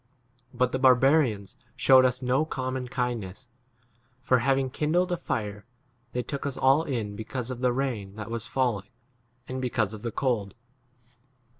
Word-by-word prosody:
But 125 -1 +1
the 130 - -1
barbarians 130 -5 +3 0.2
shewed 130 -1 +6
us 125 +1 0
no 130 +4 +2
common 130 -4 -3
kindness; 120 -3 -3 0.7
for, 130 -1 +2
having 135 +1 +1
kindled 175 +6 +1
a - - +2
fire, 105 -7 -4 0.5
they 125 - -1
took 140 +3 -5
us 140 - -4
all 135 +3 +4
in 115 -9 -3
because 120 +3 -4
of 125 - -5
the 125 -1 +3
rain 120 -7 -3
that 110 +1 -7
was 115 -1 -3
falling 115 -7 -1 0.6
and 130 0 -4
be 125 - -1
3 - - -26
cause 110 -2 +1
of 105 - -8
the 115 0 -3
cold. 110 -6 -1
125 Hz, 165 wpm, -27 LUFS, 110-130 Hz, 0.7 s, shewed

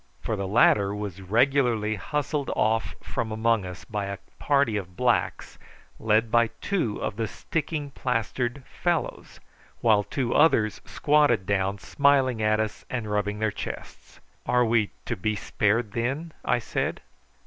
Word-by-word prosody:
For 110 - -2
the 100 -1 -3
latter 100 -1 +4
was 100 -3 -5
regularly 115 +1 +2
hustled 145 +7 -2
off 110 +1 +1
from 110 - -3
among 110 -2 +1
us 90 +1 -9
by 105 -2 -3
a 100 0 -4 0.2
party 140 -6 +2
of 90 -3 -5
blacks, 125 -1 0 0.4
led 110 +1 +2
by 120 0 +4
two 175 - -1
of 100 - -3
the 115 - -1
sticking 150 +3 -3
plastered 125 +1 -2
fellows, 175 -2 -3 0.4
while 110 -3 +4
two 125 +3 -2
others 115 -9 +3
squatted 150 -9 +2
down 100 0 0
smiling 135 -1 +2
at 110 0 +2
us 110 -1 -3
and 115 -5 -3
rubbing 105 0 0
their 110 0 0
chests. - - -8 0.3
"Are 125 0 +3
we 110 -2 +2 0.2
to 120 - -2
be 105 +2 -1
spared, 105 +2 0
then?" 135 +9 -2
I 125 - +2
said. 120 - -2
115 Hz, 150 wpm, -26 LUFS, 105-130 Hz, 0.4 s, latter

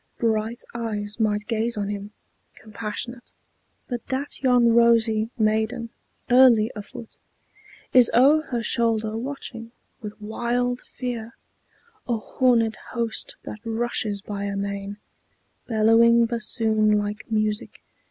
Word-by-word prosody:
Bright 225 0 -1
eyes 215 -2 -4
might 210 -1 0
gaze 230 0 -1
on 205 -1 -2
him, 205 0 -5 0.4
compassionate, 225 +3 -6 0.6
But 245 -2 -5
that 270 +2 -4
yon 250 -3 +4
rosy 230 -2 +3
maiden, 220 +2 0 0.4
early 245 -3 +6
afoot, 215 +2 -9 0.8
Is 250 -2 +7
o'er 280 +6 +6
her 240 -2 -2
shoulder 225 -2 0
watching, 235 -2 -6 0.3
with 210 -1 -8
wild 240 +3 -1
fear, 235 -2 -6 0.7
A 240 -2 0
horned 230 -1 +1 0.2
host 230 -2 -3
that 215 - -8
rushes 225 -3 -2
by 200 -1 -4
amain, 200 0 -4 0.7
Bellowing 230 +1 +5
bassoon 220 -2 +2
like 205 +2 -4
music. 215 -1 -2
225 Hz, 110 wpm, -24 LUFS, 215-240 Hz, 0.8 s, Is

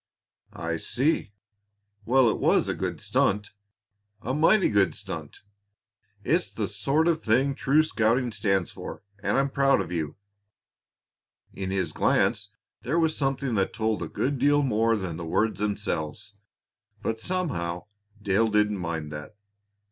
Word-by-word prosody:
"I 85 -1 -3
see. 130 - 0 0.7
Well, 130 +1 +4
it 110 - +1
was - - +3
a - - 0
good - - -3
stunt 105 +1 0 0.7
a 130 - -2
mighty 165 +8 +4
good 100 -2 +2
stunt! - - -7 0.8
It's 170 +9 +1
the 105 -3 -2
sort 135 +10 +1
of 165 -1 +2
thing 130 +5 +2
true 140 +3 +3
scouting 120 -3 +1
stands 95 -4 0
for, - - -8 0.2
and 100 +5 +1
I'm 135 0 +1
proud 135 -3 +3
of 90 -3 -4
you." 80 -4 -3 1.4
In 95 -1 -4
his 95 -4 -1
glance - - +1 0.3
there 130 +9 -1
was 160 -2 +2
something 135 -2 -1
that 95 -3 0
told 110 -1 -1
a - - -3
good 140 0 -2
deal 145 +2 +4
more 115 -2 +2
than 95 -6 -4
the 85 - -6
words 110 +5 0
themselves, 100 -3 -3 0.7
but 110 0 -2
somehow 110 - -2 0.3
Dale 100 +2 +2
didn't 105 -1 +2
mind 80 -3 -4
that. 75 +8 -8
110 Hz, 145 wpm, -26 LUFS, 95-135 Hz, 1.4 s, Well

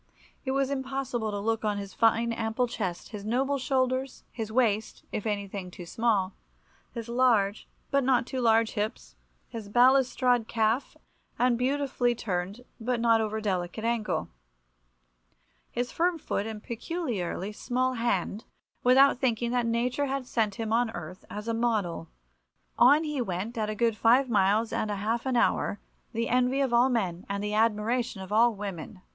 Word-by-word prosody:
It - - -2
was 275 0 +1
impossible 265 -4 -2
to 205 - -3
look 225 +2 -1
on 210 -1 0
his 200 -1 -6
fine 230 +1 +2
ample 225 +2 -1
chest, 190 -7 -4
his 210 -2 -7
noble 265 +6 0
shoulders, 260 0 -1
his 220 -2 -5
waist 220 -3 0
(if 210 - -3
anything 200 -2 -3
too 180 0 -10
small), 200 -1 0 0.6
his 230 -2 -6
large 235 -5 +2 0.2
but 275 0 +3
not 250 -2 +3
too 255 +1 -3
large 225 -1 +3
hips, 215 0 -4 0.3
his 225 -4 -8
balustrade 250 0 +4
calf 225 +3 0 0.4
and 250 0 +3
beautifully 255 -1 0
turned 200 +2 -4
but 240 +1 -1
not 230 -1 +4
over 220 0 -2
delicate 190 0 -2
ankle, 230 -2 -1 1.4
his 245 +1 -3
firm 345 0 +1
foot 215 -8 -3
and 215 -1 -7
peculiarly 230 - -3
small 255 +4 -1
hand, 230 -3 -1 0.4
without 260 +1 +5
thinking 240 -2 0
that 245 -1 +1
nature 245 +5 0
had 270 -1 -2
sent 220 -5 0
him 220 0 -2
on 235 0 +2
earth 175 +2 -8
as 210 +2 -6
a 230 - 0
model. 215 -8 -1 0.7
On 300 +3 +6
he 300 -4 -2
went 195 +2 -3
at 215 -2 -1
a 215 - -3
good 230 0 +1
five 245 +4 +4
miles 210 +2 +2
and 215 - -1
a 205 - -1
half 225 +5 -2
an 260 - 0
hour, 205 - +1 0.3
the 230 0 -1
envy 250 +2 +2
of 270 -3 +1
all 240 +2 +5
men 190 -8 -1
and 200 0 -2
the 210 0 -2
admiration 225 +1 +1
of 190 - -9
all 230 +1 +4
women." 195 -1 -7
230 Hz, 165 wpm, -28 LUFS, 210-250 Hz, 1.4 s, On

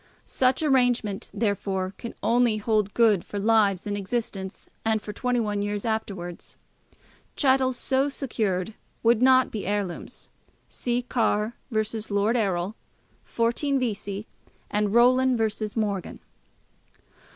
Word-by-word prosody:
Such 260 +3 +1
arrangement, 245 -7 +1
therefore, 195 -3 -1
can 235 - -7
only 235 -1 +3
hold 215 -1 0
good 220 -6 +4
for 205 - -7
lives 205 -2 +3
in 205 -1 -2
existence 200 -2 -4 0.2
and 220 -1 +2
for 210 0 -7
21 225 -3 0
years 205 +1 -2
afterwards. 195 -6 -4 0.8
Chattels 260 -2 +2
so 270 +2 +1
secured 220 -8 -2 0.3
would 230 0 +4
not 260 0 +5
be 210 -4 -4
heirlooms. 200 -3 -4 0.4
See 245 0 -1
Carr 225 -2 0 0.2
v. 215 -3 +1 0.3
Lord 205 +3 +1
Errol, 195 -4 0 0.5
14 255 +4 0
Vesey, 205 -4 -3 0.5
and 210 -1 +1
Rowland 250 +2 +4
v. 220 -1 -1
Morgan. 205 -5 -2
220 Hz, 120 wpm, -26 LUFS, 205-245 Hz, 0.8 s, not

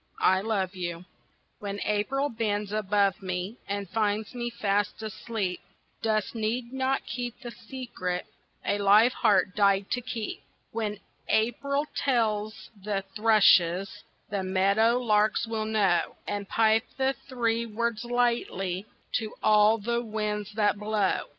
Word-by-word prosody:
"I 190 0 +5
Love 200 -3 -1
You" 175 -1 -4 0.5
When 200 0 -4
April 260 +7 0
bends 210 -3 -2
above 205 -2 +1
me 185 +4 -4
And 200 0 -3
finds 210 +2 -1
me 240 -1 -3
fast 205 -2 -1
asleep, 215 -3 -3 0.4
Dust 215 -2 0
need 235 +2 -2
not 265 0 0
keep 245 0 -5
the 240 -2 -7
secret 225 -8 -5 0.4
A 205 - +1
live 210 +5 +6
heart 190 -2 +2
died 200 -1 +3
to 245 - 0
keep. 230 -3 -5 0.3
When 215 -2 -2 0.3
April 280 +6 +1
tells 215 -5 0
the 200 -1 -1
thrushes, 195 -4 +4 0.3
The 200 -1 -1
meadow 200 +5 +3
larks 215 -3 +2
will 225 -1 -2
know, 200 -6 +1
And 205 -1 -3
pipe 225 +1 +3
the 265 0 +2
three 235 -4 -2
words 230 0 -2
lightly 235 -6 0 0.3
To 220 -2 -6
all 215 +1 +5
the 235 +3 -1
winds 210 -2 -3
that 205 -2 +2
blow. 210 -2 0
215 Hz, 130 wpm, -28 LUFS, 200-235 Hz, 0.5 s, live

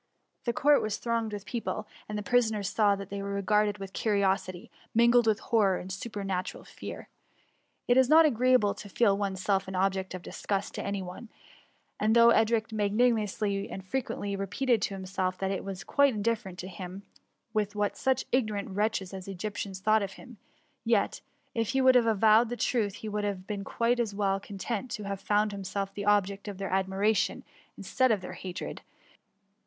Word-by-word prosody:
The 240 - +2
court 290 +4 +4
was 215 -1 -2
tbiooged 230 -2 -1
with 205 -1 -6
pec^le, 225 -2 -3 0.2
and 210 - -3
the 210 - -3
prisoners 220 -4 +1
saw 210 -2 +3
that 195 -1 -8
they 200 0 -3
were 200 0 -3
r^arded 210 +1 +2
with 195 -1 -8
curiosity, 195 -4 0 0.2
mingled 235 0 +5
with 220 -1 +3
horror 205 -6 +2
and 185 - -7
super 205 +2 -5
natural 185 -2 -3
fear. - - -9 0.8
It 245 - +4
is 260 -1 +5
not 320 +1 +8
agreeable 250 -5 +3
to 205 - -10
feel 200 0 +3
oneself 195 -1 -1
an 190 - -5
object 190 0 0
of 180 - -8
disgust 200 -1 -3
to - - -4
any 200 -1 -2
one; 185 +5 -9 0.7
and 215 +2 +2
though 235 0 +7
Edric 225 -1 +2
mipanimously 210 -2 +1
and 190 - -7
frequently 205 -2 -3
repeated 205 +5 0
to 200 - -1
himself 185 -1 -2
that 195 0 -1
it 195 - -3
was 195 -1 -6
quite 280 -4 +3
indifferent 210 -3 -2
to 180 - -6
him 185 +1 -8 0.5
what 210 -1 0
such 265 0 0
ignorant 215 -6 0
wretches 200 -1 -1
as 190 -1 -7
Egyptians 195 0 -5
thought 215 +2 +4
of 195 -1 -4
him; 245 +1 -13 0.5
yet, 225 -3 +1 0.3
if 230 -2 -1
he 270 - +2
would 260 0 +6
have 245 -2 +4
avowed 220 +1 +5
the 245 - -4
truth, 215 -6 0
he - - -3
would 210 0 -2
have 195 -3 -3
been 205 -1 -4
quite 235 +4 0
as 220 -4 -1
well 195 -1 +1
con 200 0 -10
tented 230 +4 -3
to 210 - -5
have 200 -1 -4
found 210 +1 +2
himself 195 0 -4
the 200 0 -5
object 200 -1 +1
of 200 -2 -5
their 195 -1 -4
admiration 195 +2 +1 0.3
instead 260 -1 +1
of 210 -4 +1
their 180 - -7
hatred; 185 -2 -6
and - - -24
205 Hz, 190 wpm, -29 LUFS, 195-225 Hz, 0.8 s, not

